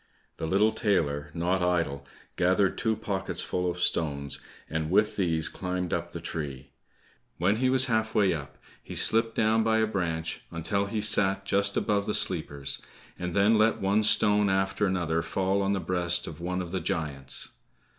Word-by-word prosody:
The 80 - -3
little 100 +6 +3
tailor, 75 -11 0
not 90 +3 0
idle, 85 -6 0 0.3
gathered 95 +2 +2
two 110 -1 0
pocketsful 95 -3 -1
of 90 - -4
stones, 70 -5 -1 0.3
and 80 0 -3
with 105 +4 +2
these 80 -5 +1
climbed 90 -1 -3
up 85 0 -2
the 85 - -6
tree. 70 -5 -6 0.7
When 100 +5 +2
he 130 +2 +2
was 130 0 +5
half 110 -2 0
way 100 -4 +4
up, 70 -4 -7 0.2
he - - -9
slipped 115 0 +1
down 110 +1 +3
by 110 0 +2
a 110 - +3
branch, 85 -6 -3
until 100 +5 -2
he 105 +1 -2
sat 95 -2 +1
just 100 +1 +1
above 100 -1 0
the 105 - 0
sleepers, 70 -6 -1 0.4
and 90 -1 -4
then 105 +2 +4
let 110 +1 +3
one 100 +2 +2
stone 105 -1 +4
after 95 +2 +1
another 85 -3 0
fall 95 +4 0
on 100 0 +1
the 100 - 0
breast 85 0 +2
of 80 +1 -9
one 90 +1 -2
of 85 - -9
the 95 - -1
giants. 70 -4 -3
95 Hz, 175 wpm, -27 LUFS, 85-105 Hz, 0.7 s, was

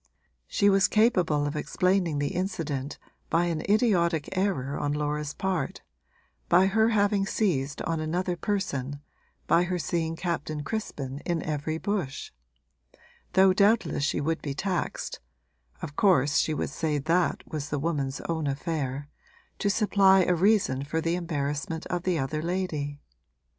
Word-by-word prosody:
She 200 - +2
was 195 -1 +5
capable 180 -10 +3
of 145 +1 -3
explaining 175 +1 +1
the 145 0 -1
incident 155 -7 -3 0.3
by 170 +1 +2
an 165 -3 -1
idiotic 180 -8 +2
error 155 -9 0
on 145 - -1
Laura's 150 0 -2
part, 185 -7 -2 0.7
by 180 +2 +6
her 220 +3 +3
having 205 -2 +2
seized 145 -12 0
on 165 -1 -1
another 175 +3 -1
person, 145 -9 -2 0.5
by 175 +1 +3
her 180 0 -1
seeing 165 0 -1
Captain 155 -4 -3
Crispin 140 -10 -4
in 170 +1 -2
every 155 +1 -2
bush; 175 -7 -3 1.0
though 190 0 +6
doubtless 200 -6 +2
she 145 - 0
would 160 +3 -1
be 140 -2 -4
taxed 185 +3 -2 0.6
(of 145 -3 -6
course 145 -8 +3
she 155 - +1
would 145 - -2
say 155 0 -1
that 165 +5 +1
was 150 -3 -5
the 145 - -1
woman's 140 -3 -2
own 160 -3 -2
affair) 140 -1 -3 0.5
to 205 - +1
supply 195 -2 +4
a 180 - +2
reason 180 -7 +2
for 155 +3 -2
the 165 +1 0
embarrassment 160 -2 -3
of 175 - -2
the 180 -1 0
other 155 +2 -2
lady. 155 -5 -2
165 Hz, 145 wpm, -27 LUFS, 145-190 Hz, 1.0 s, by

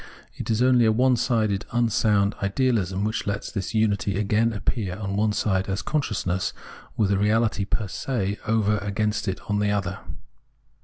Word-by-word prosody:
It - - -6
is 110 +1 +1
onlj'' 125 -3 +5
a - - +4
onesided, 115 -4 +2
unsound 105 -3 +2
ideahsm 100 -3 0
which 110 0 -2
lets 100 0 -3
this 100 0 -4
imity 100 -3 +1
again 105 +3 +2
appear 100 -3 -2
on 100 -2 -3
one 105 +1 +2
side 95 -2 0
as 95 - -2
consciousness, 105 -11 -1 0.4
with 100 -2 +2
a 100 - +3
reahty 105 0 +1
fcr 110 -1 -1
se 100 -1 -2
over 105 -1 +2
against 105 +2 -1
it 95 0 -2
on 105 0 0
the 105 0 +1
other. 100 -1 -1
105 Hz, 160 wpm, -24 LUFS, 100-110 Hz, 0.4 s, onlj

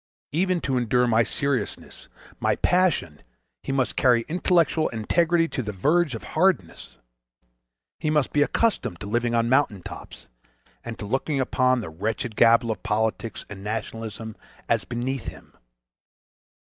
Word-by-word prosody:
Even 180 +3 +1
to 130 -2 0
endure 125 +1 +2
my 115 -1 +3
seriousness, 130 -1 -3 0.3
my - - +1
passion, 175 - +1 0.4
he - - -4
must 135 -2 0
carry 120 -3 +4
intellectual 170 -2 +2
integrity 165 +9 +1
to 130 - -3
the 105 -3 -4
verge 150 - +1
of 110 - -7
hardness. 185 +3 0 1.0
He 155 - -1
must 150 -3 +1
be 145 - +3
accustomed 175 - +1
to - - -5
living 120 +3 0
on 115 0 +2
mountain 120 -7 +2
tops—and - - -12
to - - -6
looking 135 +6 -1
upon 130 -1 +2
the 100 - -6
wretched 110 +6 -3
gabble 115 0 +5
of 110 - -5
politics 110 0 -2
and 95 -2 -9
nationalism 110 0 -5 0.3
as - - +1
beneath 125 +1 -3
him. - - -10
120 Hz, 140 wpm, -25 LUFS, 110-145 Hz, 1.0 s, gabble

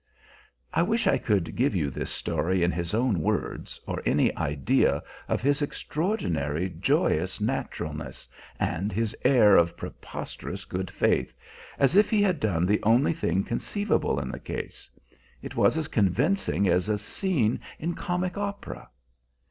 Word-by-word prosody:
I 165 - +3
wish 225 +7 +1
I - - +3
could 100 -7 0
give 130 -2 +1
you 75 -6 0
this - - -4
story 85 +3 -1
in 85 - +3
his 85 +3 -2
own 115 -7 +1
words, - - -2
or - - -3
any - - +2
idea 70 -2 +1 0.2
of - - -1
his 145 +2 +2
extraordinary, 95 - -1
joyous 80 - +1
naturalness, 75 -3 -4 0.3
and 95 +6 -1
his 110 +2 -1
air 105 -7 +6
of 85 0 +3
preposterous - - -7
good 95 0 -4
faith - - +1 0.5
as 140 +4 +3
if 205 +1 +6
he 210 -2 +3
had 185 -6 +2
done 90 -8 +1
the 105 +3 +2
only 120 +9 +4
thing 100 - 0
conceivable 200 - 0
in 65 -2 -4
the - - -6
case. - - -7 0.5
It - - -7
was - - +3
as 155 -2 -1
convincing 115 - +1
as 90 +3 +2
a 105 - +2
scene 120 - 0 0.2
in 170 +3 -2
comic 180 +3 -2
opera. 200 0 -5
105 Hz, 150 wpm, -27 LUFS, -, 0.5 s, air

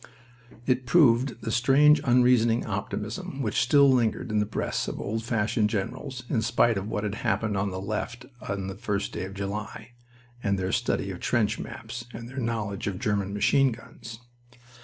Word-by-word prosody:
It 125 -1 0
proved 125 -4 +4
the 115 - -2
strange 140 +6 +5
unreasoning 120 -2 +4
optimism 135 - -4
which 105 -3 +1
still 140 +3 +5
lingered 120 -3 +1
in 105 - +2
the 105 - 0
breasts 110 - -2
of - - -4
old 110 +2 -3
fashioned 110 -2 +1
generals 125 +4 -4
in 120 -4 0
spite 115 0 +3
of 95 +1 -3
what 110 -1 -2
had 105 -1 -2
happened 105 0 -1
on 100 +1 0
the 95 0 -5
left 110 +5 -4 0.2
on 100 -1 -2
the 95 - -4
first 100 -1 -2
day 90 - -4
of 95 +1 -9
July, 105 +3 -5 0.5
and 100 -3 0
their 95 0 -2
study - - 0
of - - -7
trench 110 -1 +1
maps, 115 +1 -7
and 115 +1 -7
their 130 +2 -11
knowledge 110 -5 -2
of 100 -2 -2
German 100 -1 -1
machine 120 +6 +3
guns. 115 0 -10
115 Hz, 180 wpm, -27 LUFS, 105-125 Hz, 0.5 s, strange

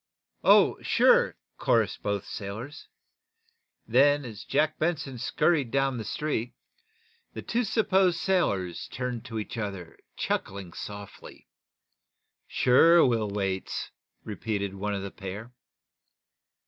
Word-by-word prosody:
"Oh, - - +5
sure!" - - +4 0.2
chorused 110 -3 +1
both 100 -1 -2
sailors. 110 +8 -7 1.0
Then, 140 +4 +4
as 110 -4 -8
Jack 150 +2 0
Benson 150 -6 -2
scurried 140 +1 +1
down 135 0 0
the - - -4
street, 125 -1 -3 0.8
the - - -7
two 240 +1 0
supposed 195 -5 +2
sailors 100 - 0
turned 125 -2 -4
to 115 - -6
each 110 +2 -5
other, 95 -6 -6 0.2
chuckling 95 -3 -3
softly. 100 -1 -9 1.0
"Sure 165 +7 +5
we'll 115 -4 +1
waits" 95 -2 -3 0.3
repeated 100 -1 -3
one 100 +1 -3
of 100 - -4
the 100 - -6
pair. 100 +5 -8
115 Hz, 110 wpm, -27 LUFS, 100-145 Hz, 1.0 s, Oh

